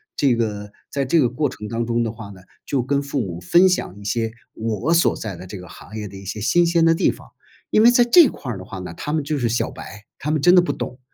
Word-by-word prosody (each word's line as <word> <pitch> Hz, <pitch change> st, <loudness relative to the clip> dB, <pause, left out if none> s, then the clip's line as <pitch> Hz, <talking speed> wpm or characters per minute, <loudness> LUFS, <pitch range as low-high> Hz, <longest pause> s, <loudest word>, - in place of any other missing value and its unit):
这 140 Hz, -4 st, +2 dB
个， 105 Hz, -3 st, -3 dB, 0.2 s
在 140 Hz, -, -1 dB
这 150 Hz, +6 st, +2 dB
个 130 Hz, -, +4 dB
过 130 Hz, +4 st, -1 dB
程 105 Hz, -, -8 dB
当 115 Hz, +2 st, -2 dB
中 120 Hz, 0 st, 0 dB
的 115 Hz, -, -2 dB
话 110 Hz, -3 st, -10 dB
呢， 95 Hz, -2 st, -12 dB, 0.3 s
就 135 Hz, -, 0 dB
跟 140 Hz, +3 st, 0 dB
父 140 Hz, 0 st, -3 dB
母 90 Hz, -7 st, -4 dB
分 175 Hz, -, +5 dB
享 140 Hz, -, -2 dB
一 100 Hz, -, -12 dB
些， 115 Hz, +1 st, -1 dB, 0.2 s
我 115 Hz, -, -1 dB
所 170 Hz, -, +4 dB
在 105 Hz, -4 st, -5 dB
的 90 Hz, +2 st, -10 dB
这 100 Hz, +2 st, -8 dB
个 90 Hz, -1 st, -11 dB
行 110 Hz, -, -11 dB
业 105 Hz, -1 st, -5 dB
的 100 Hz, -, -12 dB
一 95 Hz, -, -10 dB
些 100 Hz, +3 st, -5 dB
新 175 Hz, +11 st, +3 dB
鲜 170 Hz, -1 st, +3 dB
的 165 Hz, 0 st, +4 dB
地 -, -, +2 dB
方。 -, -, -14 dB, 0.4 s
因 215 Hz, -, +4 dB
为 230 Hz, -, +8 dB
在 245 Hz, 0 st, +5 dB
这 305 Hz, +6 st, +7 dB
块 130 Hz, -, -6 dB
儿 100 Hz, -, -6 dB
的 -, -, -8 dB
话 95 Hz, -, -8 dB
呢， 90 Hz, -2 st, -7 dB
他 150 Hz, -, -5 dB
们 155 Hz, -2 st, 0 dB
就 145 Hz, 0 st, -2 dB
是 120 Hz, -3 st, 0 dB
小 120 Hz, -, -1 dB
白， 100 Hz, +1 st, -11 dB, 0.2 s
他 150 Hz, -, -4 dB
们 155 Hz, 0 st, +1 dB
真 175 Hz, -, +6 dB
的 180 Hz, -, +7 dB
不 175 Hz, -, -1 dB
懂， 125 Hz, -, -6 dB
120 Hz, 305 characters per minute, -21 LUFS, 105-155 Hz, 0.4 s, 为